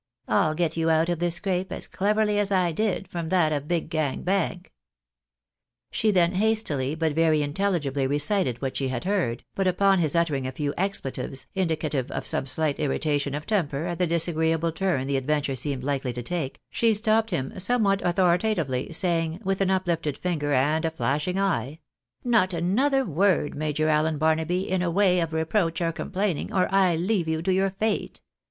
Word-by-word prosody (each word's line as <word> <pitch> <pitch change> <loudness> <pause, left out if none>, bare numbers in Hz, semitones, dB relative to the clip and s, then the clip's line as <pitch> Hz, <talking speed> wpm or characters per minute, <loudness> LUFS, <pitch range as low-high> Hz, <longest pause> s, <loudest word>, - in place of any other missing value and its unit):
I'll 155 0 +2
get 165 -1 0
you 165 0 +1
out 160 +1 +3
of 175 -2 -1
this 175 -1 +1
scrape, 185 0 -2
as - - -4
cleverly 210 +1 +1
as 200 -1 0
I 180 -3 +2
did 195 0 -1
from 170 -3 -5
that 160 -4 +2
of 145 0 -3
Big 170 -1 -1
Gang 155 -4 -1
Bank." 185 -1 -1 1.2
She 220 - +1
then 180 -4 +3
hastily 190 -9 0
but 160 -2 0
very 160 -1 +3
inteUigibly 145 -4 -1
recited 145 - +1
what 135 - -2
she 135 - -1
had 130 -2 -3
heard, 180 - -1
but 195 -1 0
upon 195 +1 +3
his 155 -3 +1
uttering 150 -6 +1
a - - -3
few 145 +2 -3
expletives, 135 -8 -3
indicative 155 -7 -1
of - - -4
some - - -1
sUght 145 +2 0
irritation 145 0 -1
of 150 +1 -5
temper 165 -8 -1
at 175 -1 -4
the 180 - +2
disagreeable 165 0 +1
turn 170 -6 -1
the 140 0 0
adventure 145 0 -1
seemed 135 -1 -3
likely 135 -2 -2
to 120 0 -5
take, 160 -1 -3
she 230 -2 +2
stopped 220 +1 +2
him 160 -2 -3
somewhat 200 -1 +2
authoritatively, 175 -6 +1
saying, 165 -1 -1
with 195 0 -1
an 190 - +2
uplifted 170 -6 -1
finger 155 -5 -2
and 145 +4 +2
a 165 - +1
flashing 160 +3 -1
eye 190 -7 -1
— 120 - -64
" - - -40
ISTot 215 -6 +3
another 260 - +1
word, 180 -2 +1
Major 155 +1 -1
Allen 155 0 +2
Barnaby, 160 +4 0
in 185 0 0
the 180 - 0
way 185 +1 +3
o£ 165 -2 -1
reproach 165 +1 0
or 165 -1 0
complaining, 185 +1 -2
or 185 -1 +2
I 190 -3 +4
leave 180 +1 0
you 160 0 -1
to 190 +1 +1
your 195 +1 +2
fate 210 +3 -2
165 Hz, 185 wpm, -25 LUFS, 150-190 Hz, 1.2 s, I